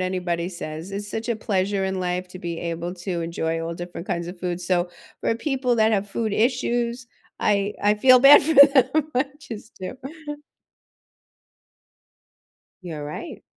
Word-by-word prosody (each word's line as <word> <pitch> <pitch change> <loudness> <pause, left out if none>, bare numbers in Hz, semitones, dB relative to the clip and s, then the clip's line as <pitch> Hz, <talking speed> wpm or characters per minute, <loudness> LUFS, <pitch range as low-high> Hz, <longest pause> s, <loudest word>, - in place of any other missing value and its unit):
anybody 180 -2 -1
says, 165 -1 -7
it's 200 +1 -5
such 225 +3 -4
a 235 - 0
pleasure 200 -2 0
in 190 -1 -2
life 180 0 -2
to 185 - -10
be 170 -2 -5
able 170 +1 -4
to 175 -1 -4
enjoy 165 -1 -2
all 165 +1 -4
different 175 +1 -7
kinds 170 -3 -2
of 175 0 -9
food. 175 -1 -2
So 175 0 0 0.3
for - - +1
people 255 -1 0
that 220 0 +3
have 205 -1 0
food 220 +1 -2
issues, 240 +1 0 0.3
I 205 0 +1
I 205 +1 +4
feel 255 +3 +6
bad 280 +2 +9
for 320 +2 0
them, 280 +2 +6
I 255 +3 +3
just 225 -6 -10
do. 185 +7 -6 2.9
You're 160 -4 -6
right. 150 - -7
195 Hz, 160 wpm, -23 LUFS, 175-235 Hz, 2.9 s, bad